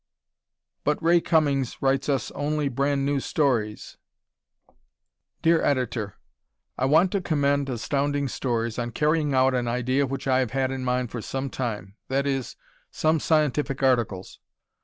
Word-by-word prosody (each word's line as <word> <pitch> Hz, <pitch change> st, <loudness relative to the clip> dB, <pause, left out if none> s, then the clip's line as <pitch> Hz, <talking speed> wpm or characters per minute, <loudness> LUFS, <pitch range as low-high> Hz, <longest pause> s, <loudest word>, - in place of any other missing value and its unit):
But 150 Hz, 0 st, +1 dB
Ray 170 Hz, +1 st, +4 dB
Cummings 145 Hz, -7 st, +1 dB
Writes 135 Hz, +1 st, +1 dB
Us 135 Hz, -5 st, 0 dB
Only 145 Hz, 0 st, -1 dB
Brand 140 Hz, +2 st, 0 dB
New 140 Hz, 0 st, +1 dB
Stories! 120 Hz, -8 st, -1 dB, 1.5 s
Dear 165 Hz, 0 st, +4 dB
Editor: 125 Hz, -6 st, -1 dB, 0.6 s
I 130 Hz, -, 0 dB
want 160 Hz, +7 st, +4 dB
to 200 Hz, -, 0 dB
commend 140 Hz, -4 st, +1 dB
Astounding 140 Hz, +3 st, -1 dB
Stories 115 Hz, -2 st, -2 dB
on 120 Hz, -1 st, -3 dB
carrying 150 Hz, -1 st, +1 dB
out 130 Hz, 0 st, +4 dB
an 125 Hz, -1 st, 0 dB
idea 130 Hz, +3 st, 0 dB
which 135 Hz, +1 st, -5 dB
I 130 Hz, -1 st, +3 dB
have 125 Hz, -2 st, -1 dB
had 135 Hz, -1 st, 0 dB
in 130 Hz, -1 st, -4 dB
mind 125 Hz, -1 st, -1 dB
for 120 Hz, -, -4 dB
some 135 Hz, +3 st, -4 dB
time; 105 Hz, -5 st, -4 dB
that 135 Hz, +1 st, 0 dB
is, 135 Hz, -2 st, -2 dB, 0.3 s
some 155 Hz, 0 st, +1 dB
scientific 150 Hz, -3 st, +1 dB
articles. 120 Hz, -8 st, 0 dB
135 Hz, 145 wpm, -25 LUFS, 125-145 Hz, 1.5 s, Ray